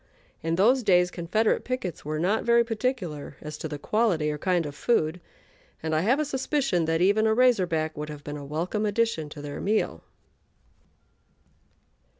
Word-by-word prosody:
In 165 Hz, +1 st, -1 dB
those 240 Hz, +9 st, +4 dB
days 180 Hz, -4 st, +3 dB
Confederate 185 Hz, +6 st, 0 dB
pickets 255 Hz, -10 st, -4 dB
were 155 Hz, +1 st, -3 dB
not 190 Hz, +7 st, +1 dB
very 235 Hz, 0 st, +4 dB
particular 225 Hz, -, -3 dB
as 150 Hz, 0 st, -7 dB
to -, -, -4 dB
the 150 Hz, -1 st, -5 dB
quality 170 Hz, -3 st, +1 dB
or 150 Hz, -, -5 dB
kind 180 Hz, -2 st, +1 dB
of 145 Hz, -, -5 dB
food, 160 Hz, -1 st, 0 dB, 0.6 s
and 160 Hz, 0 st, -1 dB
I 155 Hz, -, +3 dB
have 245 Hz, -, +2 dB
a 305 Hz, -, +1 dB
suspicion 265 Hz, -, 0 dB
that 165 Hz, +1 st, 0 dB
even 205 Hz, +4 st, +4 dB
a 220 Hz, -, +3 dB
"Razor 245 Hz, -6 st, +4 dB
Back" 155 Hz, -2 st, -1 dB
would 150 Hz, 0 st, -5 dB
have 150 Hz, -1 st, -8 dB
been 145 Hz, -, -6 dB
a 145 Hz, -, -8 dB
welcome 165 Hz, +9 st, -2 dB
addition 205 Hz, -7 st, 0 dB
to 145 Hz, -1 st, -9 dB
their 145 Hz, -1 st, -6 dB
meal. 205 Hz, -, 0 dB
180 Hz, 175 wpm, -26 LUFS, 155-225 Hz, 0.6 s, those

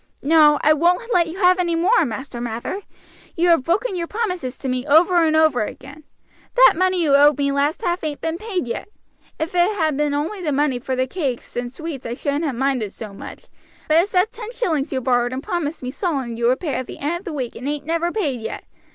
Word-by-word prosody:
"No, 300 Hz, 0 st, +5 dB
I 305 Hz, -, +6 dB
won't 355 Hz, +9 st, +1 dB
let 340 Hz, -2 st, +3 dB
you 330 Hz, +3 st, -7 dB
have 365 Hz, -1 st, +4 dB
any 345 Hz, -2 st, +1 dB
more, 365 Hz, +4 st, +3 dB
Master 245 Hz, +1 st, -6 dB
Mather. 240 Hz, -, -4 dB, 0.5 s
You 345 Hz, +1 st, +2 dB
have 330 Hz, -6 st, +4 dB
broken 390 Hz, +5 st, 0 dB
your 340 Hz, -1 st, -3 dB
promises 360 Hz, -, -3 dB
to 275 Hz, -, -6 dB
me 255 Hz, -1 st, -1 dB
over 340 Hz, +3 st, +5 dB
and 315 Hz, -1 st, +2 dB
over 315 Hz, -6 st, +3 dB
again. 275 Hz, +7 st, -9 dB, 0.5 s
That -, -, +7 dB
money 370 Hz, 0 st, +1 dB
you 290 Hz, -3 st, +2 dB
owed 290 Hz, 0 st, +5 dB
me 280 Hz, -1 st, +1 dB
last 280 Hz, +2 st, 0 dB
half 350 Hz, 0 st, -1 dB
ain't 300 Hz, -2 st, -3 dB
been 325 Hz, +1 st, -3 dB
paid 390 Hz, -, -3 dB
yet. 235 Hz, -, -5 dB, 0.5 s
If 320 Hz, +3 st, -3 dB
it 360 Hz, +4 st, +2 dB
had 310 Hz, -4 st, 0 dB
only 295 Hz, +7 st, -1 dB
been 360 Hz, -, -6 dB
the 300 Hz, -, 0 dB
money 275 Hz, -3 st, +1 dB
for 260 Hz, +1 st, -3 dB
the 255 Hz, 0 st, +1 dB
cakes 265 Hz, -4 st, -4 dB
and 245 Hz, 0 st, -3 dB
sweets 310 Hz, -2 st, -6 dB
I 235 Hz, -, -4 dB
shouldn't 285 Hz, +5 st, -2 dB
ha' 285 Hz, -, -1 dB
minded 255 Hz, -5 st, -1 dB
so 215 Hz, -3 st, -8 dB
much, -, -, -10 dB, 0.4 s
but 310 Hz, -, +5 dB
it's 370 Hz, +6 st, +2 dB
that 370 Hz, +4 st, +3 dB
ten 450 Hz, 0 st, -8 dB
shillings 330 Hz, -, -1 dB
you 260 Hz, -2 st, -1 dB
borrowed 245 Hz, 0 st, +1 dB
and 265 Hz, +2 st, -4 dB
promised 325 Hz, -5 st, -3 dB
me 250 Hz, -, -3 dB
solemn 270 Hz, -, -2 dB
you 235 Hz, 0 st, 0 dB
would 255 Hz, +2 st, +1 dB
pay 310 Hz, -6 st, -2 dB
at 255 Hz, -, -3 dB
the -, -, -8 dB
end 320 Hz, +5 st, -2 dB
of 380 Hz, -, -19 dB
the 340 Hz, -, -5 dB
week 255 Hz, -5 st, -4 dB
and 250 Hz, -, -6 dB
ain't 290 Hz, -1 st, -4 dB
never 335 Hz, +2 st, 0 dB
paid 290 Hz, -, -2 dB
yet. -, -, -6 dB
305 Hz, 240 wpm, -21 LUFS, 265-350 Hz, 0.5 s, That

